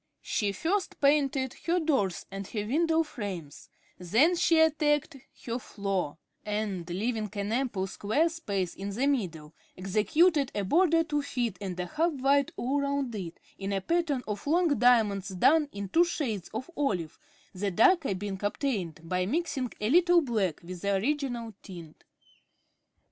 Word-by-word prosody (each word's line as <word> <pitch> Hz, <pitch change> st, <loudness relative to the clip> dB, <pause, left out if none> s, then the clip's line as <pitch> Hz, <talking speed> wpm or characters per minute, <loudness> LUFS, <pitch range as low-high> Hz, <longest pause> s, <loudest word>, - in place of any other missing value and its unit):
She 205 Hz, -2 st, 0 dB
first 355 Hz, -, -2 dB
painted 280 Hz, -2 st, +2 dB
her 350 Hz, +2 st, +3 dB
doors 270 Hz, -, 0 dB
and 195 Hz, 0 st, -6 dB
her 210 Hz, -1 st, -3 dB
window 325 Hz, +6 st, +2 dB
frames, 190 Hz, -, -7 dB, 0.3 s
then 235 Hz, -, +3 dB
she 340 Hz, -2 st, +3 dB
attacked 300 Hz, -1 st, +2 dB, 0.3 s
her 235 Hz, +1 st, -2 dB
floor, 195 Hz, -9 st, -3 dB, 0.3 s
and, 205 Hz, -5 st, -3 dB
leaving 215 Hz, +4 st, -2 dB
an 205 Hz, 0 st, -3 dB
ample 235 Hz, -6 st, 0 dB
square 215 Hz, -, 0 dB
space 200 Hz, -, -3 dB
in 195 Hz, +1 st, -6 dB
the 230 Hz, +7 st, -1 dB
middle, 170 Hz, -, -1 dB, 0.2 s
executed 265 Hz, -, +2 dB
a 205 Hz, -, 0 dB
border 330 Hz, -, +3 dB
two 295 Hz, -2 st, -1 dB
feet 240 Hz, -8 st, -3 dB
and 185 Hz, -2 st, -5 dB
a 180 Hz, -, -1 dB
half 325 Hz, -, 0 dB
wide 275 Hz, 0 st, +2 dB
all 275 Hz, +4 st, 0 dB
round 280 Hz, -3 st, -1 dB
it, 180 Hz, -6 st, -6 dB, 0.2 s
in 195 Hz, 0 st, -3 dB
a 195 Hz, -, 0 dB
pattern 300 Hz, -, 0 dB
of 210 Hz, +4 st, -5 dB
long 340 Hz, +3 st, +3 dB
diamonds 220 Hz, -6 st, +3 dB
done 290 Hz, -, +3 dB
in 200 Hz, 0 st, -5 dB
two 330 Hz, -, +4 dB
shades 225 Hz, -, -3 dB
of 255 Hz, +10 st, -6 dB
olive, 185 Hz, -, -2 dB, 0.3 s
the 200 Hz, +2 st, -2 dB
darker 325 Hz, -, +3 dB
being 195 Hz, 0 st, -5 dB
obtained 205 Hz, -, -2 dB
by 180 Hz, +2 st, -1 dB
mixing 280 Hz, -, -1 dB
a 210 Hz, -, -1 dB
little 350 Hz, +1 st, +5 dB
black 210 Hz, -, -1 dB
with 175 Hz, 0 st, -8 dB
the 200 Hz, 0 st, +1 dB
original 240 Hz, 0 st, -2 dB
tint. 170 Hz, -5 st, -11 dB
230 Hz, 155 wpm, -29 LUFS, 195-295 Hz, 0.3 s, little